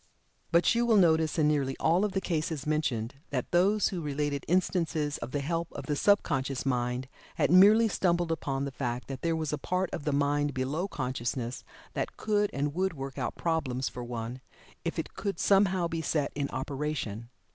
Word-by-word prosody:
But 170 +1 +4
you 235 +1 +2
will 225 -2 +5
notice 160 -4 +3
in 155 -2 +4
nearly 140 -3 +1
all 165 +3 +3
the 200 -2 0
cases 155 -5 -2
mentioned, 140 -7 -1 0.2
that 130 -3 -3
those 195 +4 +3
who 180 -3 -4
related 145 -1 -2
instances 165 -4 0
of - - -5
the 145 +2 -2
help 165 +3 -2
of - - -6
the 150 - -1
sub 205 +7 +4
conscious 135 0 -2
mind 125 0 -1 0.3
had - - +2
merely 210 +5 +7
stumbled 175 -4 +1
upon 140 -4 -2
the 140 - -4
fact 125 -2 -3
that 135 -1 -5
there 165 -1 +1
was 155 -2 -2
a 150 - -2
part 185 0 -1
of - - -4
the 150 - 0
mind 145 0 +1
below 140 +8 -1
consciousness 125 -4 -3 0.3
that - - -3
could 210 -1 +1
and 145 +1 -1
would 190 +2 0
work 135 0 -6
out 125 - -2
problems 135 -6 -1
for 125 - -7
one, 120 +1 -5 0.4
if - - -3
it - - -4
could 200 -1 -3
somehow 190 -3 +3
be 165 -1 -3
set 150 -2 0
in 140 -1 -2
operation. 135 -6 -3
150 Hz, 190 wpm, -29 LUFS, 135-175 Hz, 0.4 s, merely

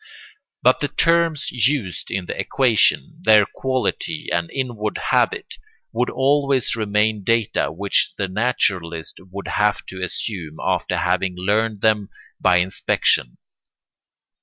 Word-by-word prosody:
But - - +4
the - - 0
terms 165 -3 +1
used 125 -5 -1
in 95 -2 -3
the - - -5
equation, 135 +6 +2
their 110 - +6
quality 130 +3 -3
and 85 +1 -1
inward 120 -6 -3
habit, - - 0 0.4
would 125 +2 0
always 135 -2 +1
remain 105 -1 0
data 115 0 +1
which 100 +5 +1
the 100 - -1
naturalist 95 -6 -1
would 100 +2 -7
have 105 0 0
to 95 -1 -8
assume 90 -4 -4
after - - -1
having 90 0 0
learned 105 +3 0
them 105 -2 +2 0.3
by 90 -1 +4
inspection. 90 -8 +1
105 Hz, 120 wpm, -21 LUFS, 95-125 Hz, 0.4 s, their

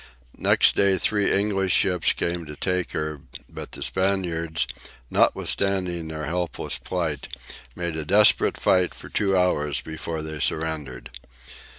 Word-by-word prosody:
Next - - +4
day 100 -1 +3
three 105 +2 +1
English 95 -2 +1
ships 90 -3 +3
came 85 -1 -3
to 75 - -8
take 90 +2 -1
her, 75 -2 -3 0.3
but - - -7
the - - -4
Spaniards, 85 -6 0 0.5
notwithstanding 90 -4 +1
their 80 -1 -5
helpless 85 +1 -3
plight, 80 -6 -3 0.5
made 85 -2 -3
a 80 - -3
desperate 105 +7 +4
fight 90 -1 +2
for - - -11
two 95 -2 +1
hours 75 -6 +1
before 80 0 -5
they 80 -1 -6
surrendered. 75 -7 -2
85 Hz, 130 wpm, -24 LUFS, 80-95 Hz, 0.5 s, Next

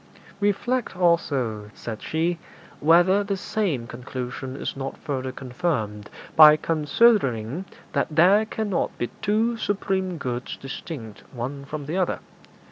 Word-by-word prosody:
'Reflect, 205 +2 0
also,' 135 - +1
said 110 -2 -6
she, 165 +2 -1 0.4
'whether 175 +6 +5
the 200 -1 -2
same 185 - -1
conclusion 125 +2 -6
is - - -4
not 135 0 -5
further 130 -4 -3
confirmed 125 -6 -3 0.3
by 155 -1 +10
considering 155 - +2 0.3
that - - +1
there 180 +7 +5
cannot 215 -4 -2
be 120 - -3
two 220 +3 +2
supreme 190 -4 -1
goods 125 -3 -4
distinct 135 -5 -7
one 135 +4 -5
from 145 0 -6
the 160 +6 -2
other. 185 -2 +1
155 Hz, 125 wpm, -24 LUFS, 130-190 Hz, 0.4 s, by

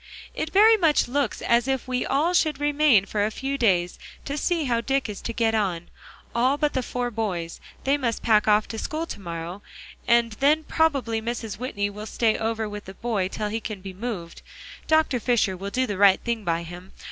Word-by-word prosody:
"It 315 - -3
very 440 +3 +6
much 325 -6 +3
looks 270 -2 -1
as 235 +1 +2
if 265 -1 -1
we 250 -1 -1
all 310 +6 +1
should 310 -5 +2
remain 290 -8 +4
for 205 0 -1
a 210 - +1
few 270 +5 -3
days, 185 -9 +1 0.3
to 280 - -3
see 330 +2 0
how 235 -4 0
Dick 270 +2 0
is 210 -2 -7
to - - -4
get 225 -1 +1
on, 185 -6 -1 0.4
all 255 +4 +2
but 295 0 0
the 260 - 0
four 245 0 -3
boys; 185 -7 -3 0.2
they 280 +2 +2
must 235 -4 -2
pack 215 -2 +3
off 210 0 +4
to 225 - -5
school 315 +7 -3
to 205 - -7
morrow, 170 +2 -6 0.5
and 235 -1 +4
then 300 +3 +3
probably 275 -9 0
Mrs. 225 -2 -4
Whitney 205 -5 -2
will 210 +2 -8
stay 225 -1 +1
over 225 0 -2
with 210 0 -7
the 190 - -10
boy 215 -5 -1
till 210 +2 -4
he 220 +2 -2
can 215 -2 -6
be 190 0 -8
moved. 190 -5 -6 0.5
Dr. 315 -5 +3
Fisher 230 -5 +1
will 195 +2 -5
do 255 +5 0
the 205 -5 -4
right 200 -2 +6
thing 235 -2 -2
by 170 -2 -1
him. 175 +2 -10
230 Hz, 210 wpm, -25 LUFS, 205-270 Hz, 0.5 s, very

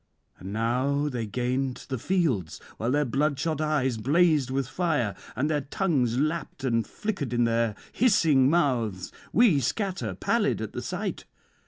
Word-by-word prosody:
And 95 +2 -7
now 130 +7 0
they 120 -5 -3
gained 125 +3 -2
the 130 -3 -2
fields, 135 - 0 0.2
while 115 - -1
their 145 +3 +2
bloodshot 145 +4 0
eyes 145 -6 +1
blazed 150 +3 +3
with 135 -1 -1
fire, 145 - 0 0.2
and 140 - 0
their 150 -2 0
tongues 135 - 0
lapped 155 -1 -2
and 115 -3 +1
flickered 185 - -4
in 120 0 +2
their 115 -2 +1 0.2
hissing 160 - +4
mouths. 120 - 0 0.2
We 215 - +5
scatter, 135 - -2
pallid - - +1
at - - -5
the - - -4
sight. - - -4
135 Hz, 150 wpm, -27 LUFS, 120-155 Hz, 0.2 s, We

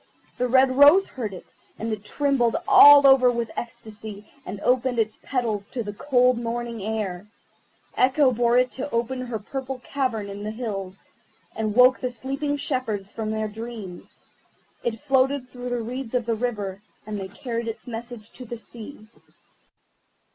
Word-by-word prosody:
The 250 - +1
red 260 +1 +4
rose 295 +8 +8
heard 230 -6 -5
it, 185 - -12 0.2
and 225 0 -3
it 210 -1 -6
trembled 270 -2 +1
all 290 0 +9
over 265 -2 +7
with 235 -2 -2
ecstasy, 220 -3 -8 0.2
and 195 +2 -5
opened 250 +1 +1
its 220 -1 -1
petals 225 -6 -2
to 240 - -4
the 205 -1 -6
cold 250 0 +2
morning 235 -1 -4
air. 205 -3 -3 0.7
Echo 265 +1 +4
bore 240 0 +2
it 250 0 +3
to 265 - -4
her 240 -1 -2
purple 265 +4 -5
cavern 250 -7 -2
in 200 0 -7
the 210 - -3
hills, 200 -5 -5 0.5
and 215 -1 -2
woke 255 +1 +6
the 250 - -2
sleeping 275 +4 -3
shepherds 225 -9 -2
from 220 -1 -4
their 220 0 -1
dreams. 215 -4 -8 0.6
It 225 -2 -2
floated 270 -1 +1
through 250 0 -7
the 245 -1 -2
reeds 250 +1 -5
of 245 -2 0
the 230 - 0
river, 210 -5 -3 0.2
and 210 -1 -4
they 190 - -5
carried 230 +3 -5
its 225 - -6
message 235 -2 -8
to 255 - -11
the 235 +1 -6
sea. 225 0 -10
235 Hz, 160 wpm, -24 LUFS, 215-255 Hz, 0.7 s, all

